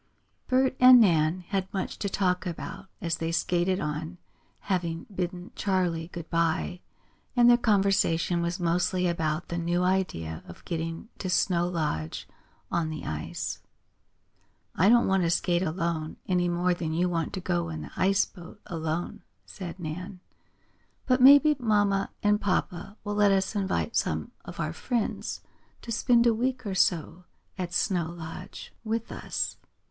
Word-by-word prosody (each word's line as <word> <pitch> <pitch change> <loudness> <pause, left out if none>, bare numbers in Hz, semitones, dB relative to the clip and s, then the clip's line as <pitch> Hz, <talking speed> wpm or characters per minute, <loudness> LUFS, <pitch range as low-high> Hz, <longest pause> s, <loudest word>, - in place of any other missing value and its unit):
Bert 260 0 +2
and 255 0 +9
Nan 170 -4 +3
had 190 -1 -2
much 195 -3 -4
to 200 - -1
talk 185 -1 0
about 190 +3 -6
as 165 -2 -1
they 165 0 -2
skated 180 +2 +1
on, 155 +4 -4 0.4
having 170 -3 -2
bidden 180 0 -4
Charley 180 -5 0
good 170 -2 -8
bye, 165 +2 0 0.5
and 240 -1 +6
their 240 - +8
conversation 195 -6 +2
was 170 +2 -2
mostly 180 +1 +1
about 165 -1 -1
the 170 - -2
new 175 +1 0
idea 130 - -1
of 85 - -12
getting 165 +4 -4
to 185 - -3
Snow 175 -1 +2
Lodge 150 - -3 0.4
on 165 -2 0
the 155 -1 -6
ice. 75 -1 -4 1.1
"I 190 +5 +4
don't 235 +1 +6
want 190 0 +2
to 170 - +1
skate 175 0 +1
alone, 165 -2 -2
any 180 -1 +1
more 175 +1 +1
than 165 -2 -3
you 175 +3 +1
want 165 -3 -1
to - - -3
go 85 - -1
in 80 -1 -5
the 75 - -10
ice 195 +2 +3
boat 180 +2 -13
alone," 160 0 -3 0.2
said 185 -1 -8
Nan. 180 +4 -6 0.9
"But 255 0 +2
maybe 285 +3 +8
mamma 205 -4 +2
and 210 0 +3
papa 195 +1 -2
will 205 - -3
let 205 -1 +4
us 195 +2 +1
invite 200 +3 -1
some - - -1
of - - -10
our - - -2
friends 235 -4 -2 0.4
to 235 - -6
spend 235 +1 +3
a 235 - +5
week 255 +2 -1
or 200 - -2
so 175 -1 +1 0.3
at 180 -2 -4
Snow 180 -2 0
Lodge 165 -1 -9
with 225 +1 -2
us. - - -3
180 Hz, 155 wpm, -27 LUFS, 165-200 Hz, 1.1 s, and